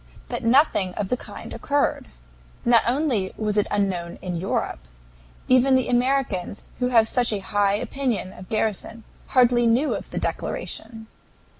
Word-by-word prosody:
But - - -4
nothing 230 - +3
of 200 -2 -3
the - - +2
kind - - -9
occurred. 285 0 0 0.6
Not 235 -1 +6
only 245 -7 0
was 210 -1 -1
it 210 - +2
unknown 185 -4 -1
in 180 -1 -3
Europe, 165 - -3 0.6
even 255 +1 +5
the 260 -2 +2
Americans, 245 -7 0
who 250 - +1
have 230 -3 +4
such 245 0 +2
a 210 - 0
high 200 +1 +1
opinion 240 -4 -2
of 185 - -12
Garrison, 220 +1 -2 0.2
hardly 245 -2 +4
knew 250 +6 +2
of - - -6
the - - -6
declaration. 225 - -4
230 Hz, 150 wpm, -24 LUFS, 200-255 Hz, 0.6 s, Not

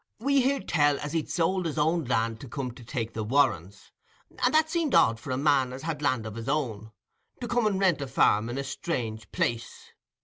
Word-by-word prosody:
We 275 +4 +2
heared 270 +2 0
tell 145 -3 +2
as 145 +1 -5
he'd 160 -2 -1
sold 180 +1 0
his 155 - -5
own 160 +1 +1
land 115 -2 0
to 135 - -9
come 135 -1 -4
and 120 -1 -13
take 115 -4 -3
the 110 - -3
Warrens, 100 - 0 0.5
and 250 - +4
that 315 +1 +4
seemed 325 -3 0
odd 115 0 +4
for 145 - -10
a 130 - -1
man 135 -3 +2
as 130 +1 -8
had 155 -2 -3
land 130 -6 0
of 110 - -6
his 115 +3 -6
own, 115 -8 -2 0.5
to 245 - -5
come 240 -2 +1
and 195 -2 0
rent 185 -6 +2
a 140 - -3
farm 115 -4 +2
in 120 - -4
a 140 - -2
strange 115 - -4
place. 115 0 -3
140 Hz, 225 wpm, -27 LUFS, 115-170 Hz, 0.5 s, and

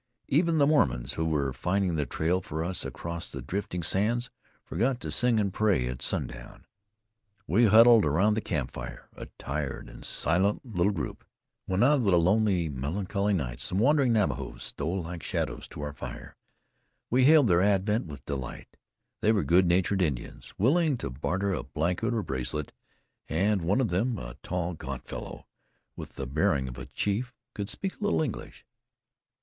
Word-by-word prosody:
Even 165 +3 +3
the 145 - +5
Mormons, 65 - +2
who 80 - -1
were 70 -4 0
finding 95 +2 0
the 75 -3 -1
trail 90 +4 0
for 80 -1 -4
us 90 0 -2
across 85 0 -4
the 70 - -6
drifting 90 +5 -4
sands, 115 +8 +1 0.3
forgot 120 +9 0
to - - -4
sing 120 -2 +3
and 100 -3 0
pray 100 -13 +2
at 65 +1 -5
sundown. - - -4 0.8
We 115 +6 +4
huddled 115 +1 +7
round 95 +9 +3
the 110 - -1
campfire, 65 -8 -5
a - - -8
tired 70 0 -4
and - - -12
silent 95 - +1
little 100 -4 +1
group. 85 -7 -5 0.4
When 95 +4 +2
out 145 +4 +5
of 130 - 0
the 95 -3 +4
lonely, 95 0 +3
melancholy 95 - -1
night - - -3
some 90 - -1
wandering 135 +3 +4
Navajos 70 - -1
stole 85 +5 -3
like 85 0 -6
shadows - - -3
to - - -9
our 75 0 -4
fire, - - -8 0.8
we 130 +2 +4
hailed 150 -3 +7
their 90 -2 +4
advent 100 +1 +2
with 70 -3 -10
delight. 65 -3 -6 0.4
They 110 - +3
were 105 -4 +2
good 90 +2 +4
natured 95 +3 +2
Indians, 70 -8 -3
willing 145 - +3
to 70 - -5
barter 95 +9 -1
a - - -2
blanket 90 +9 -1
or 115 -3 -1
bracelet; 65 +2 -3 0.6
and 95 +4 +1
one 95 +8 +1
of 125 -5 +1
them, 110 +7 0
a - - -7
tall, 90 0 -2
gaunt 80 - -7
fellow, - - -7 0.5
with - - -9
the 65 - -4
bearing 70 0 +1
of 60 - -7
a - - -8
chief, 120 +5 -2 0.2
could 100 -1 -4
speak 190 - -4
a - - -6
little 205 -6 +2
English. 130 -8 -6
95 Hz, 175 wpm, -28 LUFS, 75-110 Hz, 0.8 s, huddled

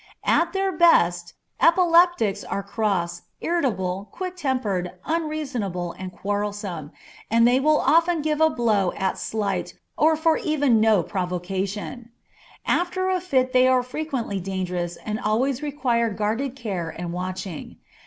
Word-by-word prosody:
At 335 0 +3
their 385 0 0
best, 175 - +3 0.3
epileptics 335 - +4
are 200 - -3
cross, 190 -5 -1 0.2
irritable, 200 - -1
quick 370 -1 -5
tempered, 240 - -1
unreasonable, 280 - -2
and 185 +1 -8
quarrelsome, 200 -5 -4 0.4
and 230 +1 +5
they 250 +2 +4
will 305 +2 +3
often 330 +3 +3
give 305 0 0
a 315 - +6
blow 215 - +1
at 190 -1 -2
slight, 195 -5 -2 0.2
or 315 +1 +4 0.2
even 305 - +1
for - - +4
no 215 -4 +4
provocation. 190 +6 -4 0.6
After 370 +1 0
a 370 -1 0
fit 260 -8 +1
they 255 0 +5
are 255 -1 +3
frequently 250 -6 -3
dangerous 180 -2 -3
and 215 0 -2
always 245 +5 0
require 255 -6 0
guarded 220 +6 -2
care 195 -10 -4
and 170 +1 -6
watching. 185 -2 -5
225 Hz, 135 wpm, -24 LUFS, 190-300 Hz, 0.6 s, a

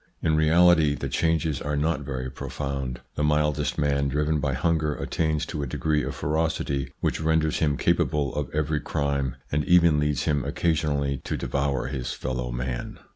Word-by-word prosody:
In 80 -1 +3
reality, 80 -1 +5
the - - -4
changes 80 -4 0
are 75 0 -2
not 75 0 +1
very 65 -2 -4
profound. 70 -4 -4
The 75 - -2
mildest 75 0 +1
man, 70 -1 +1
driven 75 +2 0
by 70 -1 0
hunger, 75 +2 +1
attains 80 -2 -1
to 75 - -4
a 70 - -2
degree 75 +4 0
of - - -4
ferocity 75 -3 -1
which - - 0
renders 80 -1 +1
him 75 -3 +1
capable 70 -3 +1
of 75 -3 -2
every 75 0 0
crime, 70 -4 -1 0.2
and 75 +1 +1
even 85 -4 +5
leads 75 -3 0
him 70 -3 +1
occasionally 70 -5 0
to - - -2
devour 70 -1 -1
his 65 -2 -3
fellow 60 -1 -3
man. - - -4
75 Hz, 170 wpm, -26 LUFS, 70-80 Hz, 0.2 s, reality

